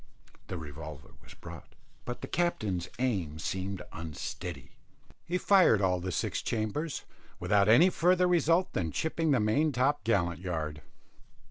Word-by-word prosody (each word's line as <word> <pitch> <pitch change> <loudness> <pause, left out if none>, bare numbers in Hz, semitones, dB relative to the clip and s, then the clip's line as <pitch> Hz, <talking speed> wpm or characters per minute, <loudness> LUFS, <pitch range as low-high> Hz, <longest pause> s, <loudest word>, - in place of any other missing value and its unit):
The 90 - -4
revolver 75 -2 -9
was - - -14
brought, - - -11 0.3
but 120 - -5
the - - -5
captain's 105 - -1
aim 100 -12 -1
seemed 95 +4 -3
unsteady; 80 -3 -6 0.6
he 175 +2 0
fired 185 - +5
all 90 -2 +2
the 90 +1 -4
six - - -1
chambers, 115 +8 -2 0.4
without 100 0 +3
any 165 +12 +7
further 180 +1 +3
result 175 +1 +2
than 80 -4 -1
chipping 160 - -1
the 135 -4 +4
main 125 +9 +2
top 130 0 +1
gallant 85 -7 +1
yard. 80 -4 -3
105 Hz, 140 wpm, -30 LUFS, -, 0.6 s, any